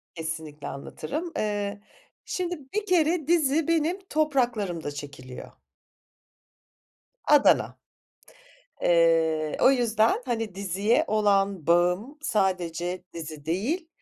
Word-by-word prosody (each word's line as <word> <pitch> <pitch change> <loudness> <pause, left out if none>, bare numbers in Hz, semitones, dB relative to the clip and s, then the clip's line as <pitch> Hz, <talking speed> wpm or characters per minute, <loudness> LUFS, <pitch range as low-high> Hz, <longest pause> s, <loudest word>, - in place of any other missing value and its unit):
Kesinlikle 160 -2 -6
anlatırım. 160 - -5
Eee, 205 -1 -2 0.4
şimdi 355 -2 -3
bir 425 0 -1
kere 335 -4 +2
dizi 315 -2 +2
benim 330 +3 +1
topraklarımda 240 - 0
çekiliyor. 140 -3 -9 1.7
Adana. 295 -1 +4 1.0
Eee, 165 -2 +3
o 260 - +7
yüzden, 230 -3 +2
hani, 225 -6 -3
diziye 200 +4 +1
olan 200 -5 +1
bağım 180 - +2
sadece 180 - -1
dizi 155 -3 -8
değil, 250 - -1
205 Hz, 90 wpm, -26 LUFS, -, 1.7 s, o